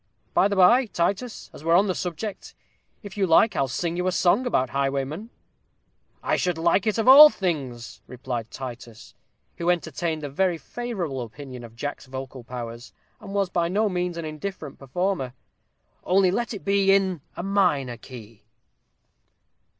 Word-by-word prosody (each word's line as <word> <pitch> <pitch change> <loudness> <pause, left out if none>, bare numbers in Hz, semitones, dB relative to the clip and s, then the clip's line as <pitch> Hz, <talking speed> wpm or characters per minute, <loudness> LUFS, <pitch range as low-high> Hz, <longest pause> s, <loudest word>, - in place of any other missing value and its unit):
By - - +4
the 200 - -2
by, 235 +7 +5
Titus, 200 +6 -2
as - - -12
we're 165 +1 +2
upon 195 +3 +5
the 190 - 0
subject, 180 +4 -5 0.5
if 205 0 -10
you 195 -2 +1
like 180 +6 +4
I'll 135 - +1
sing 170 +6 -3
you 180 +1 -1
a - - +2
song 195 +8 +2
about 130 - 0
highwaymen." 140 +8 -2 0.9
"I - - +1
should 180 -2 0
like 170 +5 +2
it 215 - +1
of 225 - 0
all 290 +4 +11
things," 140 - -4
replied 120 -2 -5
Titus, 120 -3 -9 0.4
who 170 +1 -1
entertained 160 -2 -1
a - - -2
very 180 +3 +1
favorable 180 - -4
opinion 125 +1 -9
of 115 -1 -12
Jack's 145 +2 -5
vocal 130 -1 -7
powers, 120 0 -8 0.3
and 200 -1 -8
was 195 -2 0
by 170 -1 +1
no 210 +4 +1
means 180 -2 -2
an 165 - -4
indifferent 155 -1 -6
performer; 135 -2 -2 0.7
"only 185 0 +3
let 235 +3 -2
it 200 - -10
be 200 -1 +3
in 190 -5 +2 0.2
a - - -4
minor 150 -11 +1
key." 115 -4 -12
170 Hz, 165 wpm, -24 LUFS, 135-195 Hz, 0.9 s, all